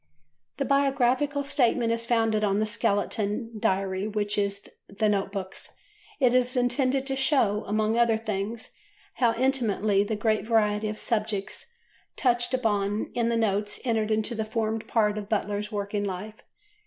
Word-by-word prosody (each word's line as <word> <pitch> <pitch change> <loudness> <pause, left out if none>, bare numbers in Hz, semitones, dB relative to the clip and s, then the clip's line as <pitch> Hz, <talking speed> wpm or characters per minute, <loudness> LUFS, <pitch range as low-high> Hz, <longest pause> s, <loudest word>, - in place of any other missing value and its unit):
The - - -1
Biographical 275 +1 +2
Statement 245 -4 +2
is 230 0 0
founded 225 -2 +2
on 200 0 +2
a 215 - +1
skeleton 215 +1 -1
Diary 190 0 0
which 210 -1 -1
is 200 -1 -2 0.2
in 200 - -15
the 215 +1 +2
Note 200 -2 0
Books. 190 -2 -6 0.4
It 250 -2 +4
is 255 +1 +2
intended 260 +2 +1
to 270 0 -2
show, 260 -7 +2
among 215 +2 +1
other 235 -2 +4
things, 220 +1 -4 0.4
how 235 -3 +3
intimately 220 -6 +2
the 215 +1 -2
great 215 0 0
variety 215 -2 +2
of 215 - -5
subjects 215 - -2 0.5
touched 240 -2 +1
upon 210 -3 -1
in 235 -1 0
the 235 - +1
notes 210 -2 0
entered 220 -3 0
into 220 +2 0
and 220 -1 -3
formed 220 0 -2
part 210 -2 +1
of 205 0 -8
Butler's 210 -1 -1
working 205 0 -2
life. 205 +3 -5
220 Hz, 155 wpm, -26 LUFS, 205-235 Hz, 0.5 s, It